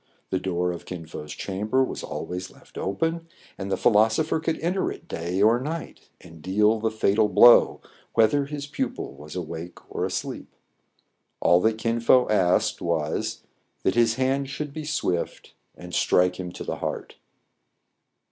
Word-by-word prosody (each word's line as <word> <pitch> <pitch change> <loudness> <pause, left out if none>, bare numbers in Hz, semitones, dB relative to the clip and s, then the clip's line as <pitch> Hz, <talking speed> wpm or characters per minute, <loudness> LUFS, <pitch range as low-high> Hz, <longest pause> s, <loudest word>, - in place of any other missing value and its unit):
The 95 - +1
door 90 -1 -1
of 85 - -8
Kin 90 -3 -6
Fo*s 75 -1 -8
cham 100 +2 -4
ber 130 +4 +3
was - - -4
always 90 +1 -5
left - - -21
open; 165 - -2 0.3
and 100 0 -5
the - - +1
philosopher 110 +7 +3
could 160 0 -2
enter 180 +3 0
it 170 - -10
day 90 - -1
or 115 +3 +5
night, 160 +4 -6
and 80 -2 -14
deal 105 +5 +2
the 110 +1 0
fatal 110 -1 +2
blow, 110 +5 +7 0.3
whether 115 +6 +4
his 145 0 -5
pupil 145 - -4
was 75 +3 -11
awake 85 -1 -6 0.2
or - - -2
asleep. - - -4 0.8
All 85 +1 +4
that 110 +1 +2
Kin 115 +1 -1
Fo 125 +2 +5
asked 95 -4 +2
was, - - -2 0.4
that 95 - +2
his 115 -1 +3
hand 135 +1 0
should 145 +1 -5
be 155 0 -6
swift, 90 - -2 0.2
and 90 0 -10
strike 90 0 +2
him 90 -1 -5
to - - -7
the - - -4
heart. - - -5
110 Hz, 165 wpm, -25 LUFS, 90-130 Hz, 0.8 s, blow